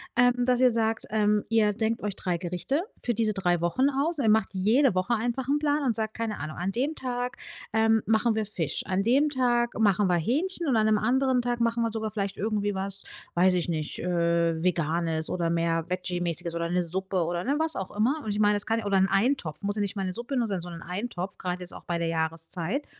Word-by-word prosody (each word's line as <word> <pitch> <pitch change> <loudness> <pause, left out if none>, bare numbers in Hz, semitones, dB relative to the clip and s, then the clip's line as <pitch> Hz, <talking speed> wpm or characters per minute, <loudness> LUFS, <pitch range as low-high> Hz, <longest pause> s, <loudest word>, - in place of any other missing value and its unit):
ähm, 245 0 +3
dass 250 0 +2
ihr 255 -1 +6
sagt, 225 -1 0
ähm, 210 -1 +2
ihr 215 -2 +3
denkt 225 +2 -1
euch 205 -2 -3
3 180 -2 -2
Gerichte 180 - -2 0.2
für 240 - -1
diese 220 -1 0
3 175 -3 0
Wochen 255 +11 +2
aus. 295 +5 0
Ihr 235 -7 +2
macht 220 -2 +3
jede 220 +5 +3
Woche 185 +6 +1
einfach 240 +3 -1
'n 290 +2 +2
Plan 295 -1 +1
und 240 -4 +1
sagt, 220 -1 -2
keine 225 -2 -3
Ahnung: 155 +1 -6
„An 180 +3 -2
dem 275 +8 -1
Tag, 245 -2 -3 0.3
ähm, 220 0 +3
machen 225 +1 +3
wir 215 -1 -1
Fisch. 180 -8 -2
An 190 +1 0
dem 275 +7 +3
Tag 240 -3 +1
machen 205 -2 +3
wir 180 - +3
Hähnchen, 330 - -1
und 260 - +2
an 215 -1 +3
'nem 215 -1 +4
anderen 255 +3 +2
Tag 240 0 -1
machen 235 0 +1
wir 230 - 0
sogar 220 0 -2
vielleicht 200 -2 -3
irgendwie 205 -1 -1
was, 195 0 +3 0.3
weiß 185 +2 +5
ich 175 -1 0
nicht, 155 -2 -3
äh, 170 -1 +1
Veganes 165 -2 0
oder 170 -2 -1
mehr 165 -1 0
Veggie-mäßiges 175 -2 -3
oder 170 0 -1
'ne 180 +1 +1
Suppe“ 185 +1 0
oder, 175 +1 -2
ne, 280 +3 0
was 320 0 0
auch 190 0 -5
immer. 255 +9 +1
Und 220 - -5
ich 205 - -2
mein, 210 0 +4
es 205 - 0
kann 225 0 0
ja 220 - -6
oder 200 -1 +2
'n 190 - +4
Eintopf, 195 - 0
muss 205 0 -1
ja 210 - -1
nicht 200 +1 -2
mal 195 - -1
'ne 185 - -3
Suppe 240 +6 -4
nur 235 -2 +1
sein, 195 -4 -2
sondern 170 -1 -8
Eintopf, 185 +1 -5
grad 180 0 -3
jetzt 180 0 -6
auch - - -10
bei 175 - -1
der 170 0 -1
Jahreszeit. 165 - -2
210 Hz, 235 wpm, -27 LUFS, 180-240 Hz, 0.3 s, ihr